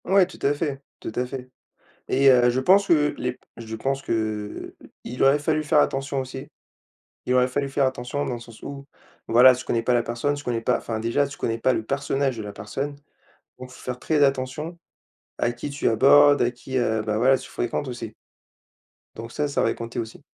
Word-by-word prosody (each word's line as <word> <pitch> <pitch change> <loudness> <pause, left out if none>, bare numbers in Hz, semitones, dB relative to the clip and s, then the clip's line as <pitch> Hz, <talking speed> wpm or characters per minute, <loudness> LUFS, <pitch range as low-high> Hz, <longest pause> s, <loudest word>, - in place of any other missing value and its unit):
Ouais 190 0 +5
tout 185 - -14
à 140 - +2
fait, 145 -3 -3 0.2
tout - - -6
à 125 - 0
fait 130 -1 -8 0.6
et 135 +1 +4
heu, 125 -1 +5
je 125 +2 0
pense 195 +8 +5
que 150 -3 +3
les 125 - -2
p - - -27 0.2
je 110 -1 -7
pense 135 +4 -2
que, - - -10 0.7
heu, - - -14 0.2
il 125 - -4
aurait 135 +2 +5
fallu 155 +1 0
faire 150 0 +2
attention 135 0 0
aussi 130 0 -7 0.8
il 125 - +1
aurait 125 0 +4
fallu 140 +2 -2
faire 135 0 +1
attention 130 +2 -2
dans 125 - -3
le 120 - -7
sens 115 -1 -14
où 140 -1 -8 0.4
voilà, 125 +3 +7
tu 130 +1 -7
connais 115 - 0
pas 125 - +1
la 120 - +3
personne, 120 +5 -1
tu 145 0 -8
connais 120 -2 -2
pas 125 - +2
enfin 115 -1 -4
déjà 115 +6 +1
tu 140 +1 -9
connais 115 0 -2
pas 130 +3 +2
le - - -1
personnage 135 0 -1
de - - -4
la 105 -1 -7
personne, 135 +8 -5 0.6
donc 130 0 -9
faut 125 - -14
faire 125 -1 -5
très 150 -2 +2
attention 135 +5 -1 0.6
à 120 - +1
qui 120 +4 -6
tu 140 0 0
abordes, 145 +5 +6
à 120 0 +2
qui, 130 +2 -5
heu, 110 -3 +1
bah 105 -1 0
voilà 130 +4 +4
tu - - -11
fréquentes 120 +3 -3
aussi 120 -3 -7 1.0
donc 115 +1 -8
ça, 150 +3 -1
ça 140 - -1
va - - +2
y - - -4
compter 115 +1 -6
aussi. 110 -1 -7
130 Hz, 225 wpm, -24 LUFS, 120-140 Hz, 1.0 s, voilà